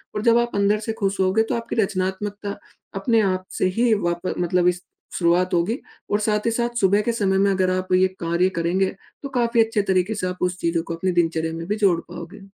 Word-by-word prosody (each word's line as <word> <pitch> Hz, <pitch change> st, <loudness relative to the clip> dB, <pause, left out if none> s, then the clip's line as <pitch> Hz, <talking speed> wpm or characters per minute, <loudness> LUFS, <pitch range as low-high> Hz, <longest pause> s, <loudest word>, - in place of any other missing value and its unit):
और 210 Hz, -, -1 dB
जब 230 Hz, 0 st, +5 dB
आप 240 Hz, 0 st, 0 dB
अंदर 200 Hz, +1 st, +2 dB
से 220 Hz, +1 st, -3 dB
खुश 195 Hz, -2 st, -1 dB
हो 185 Hz, 0 st, +3 dB
गए 220 Hz, +2 st, +3 dB
तो -, -, 0 dB
आपकी 230 Hz, 0 st, -4 dB
रचनात्मकता 200 Hz, 0 st, -2 dB, 0.4 s
अपने 220 Hz, +4 st, +2 dB
आप 185 Hz, -2 st, 0 dB
से -, -, +3 dB
ही 240 Hz, -1 st, +4 dB
वाप 175 Hz, +1 st, -2 dB
मतलब 180 Hz, 0 st, +2 dB
इस 180 Hz, 0 st, +1 dB, 0.4 s
शुरुआत 180 Hz, +2 st, +2 dB
होगी। 205 Hz, -, 0 dB, 0.3 s
और 205 Hz, -, +2 dB
साथ 210 Hz, -1 st, 0 dB
ही -, -, +2 dB
साथ 235 Hz, +1 st, -1 dB
सुबह 200 Hz, +2 st, +4 dB
के -, -, +1 dB
समय 190 Hz, -1 st, +2 dB
में 200 Hz, 0 st, +3 dB
अगर 185 Hz, -1 st, +1 dB
आप 185 Hz, 0 st, -2 dB
ये 185 Hz, +1 st, +5 dB
कार्य 170 Hz, +2 st, +1 dB
करेंगे। 185 Hz, +3 st, 0 dB, 0.3 s
तो 280 Hz, -, -4 dB
काफ़ी 235 Hz, -1 st, +3 dB
अच्छे 225 Hz, -1 st, 0 dB
तरीके 185 Hz, +3 st, +1 dB
से 185 Hz, -2 st, -2 dB
आप 180 Hz, 0 st, -4 dB
उस 180 Hz, -, -11 dB
चीज़ों 170 Hz, -1 st, 0 dB
को 170 Hz, -, -5 dB
अपनी 185 Hz, +3 st, -1 dB
दिनचर्या 160 Hz, -1 st, -2 dB
में 165 Hz, 0 st, -5 dB
भी 210 Hz, -, 0 dB
जोड़ 195 Hz, -6 st, +3 dB
पाओगे। 175 Hz, +3 st, -9 dB
190 Hz, 230 wpm, -22 LUFS, 180-210 Hz, 0.4 s, जब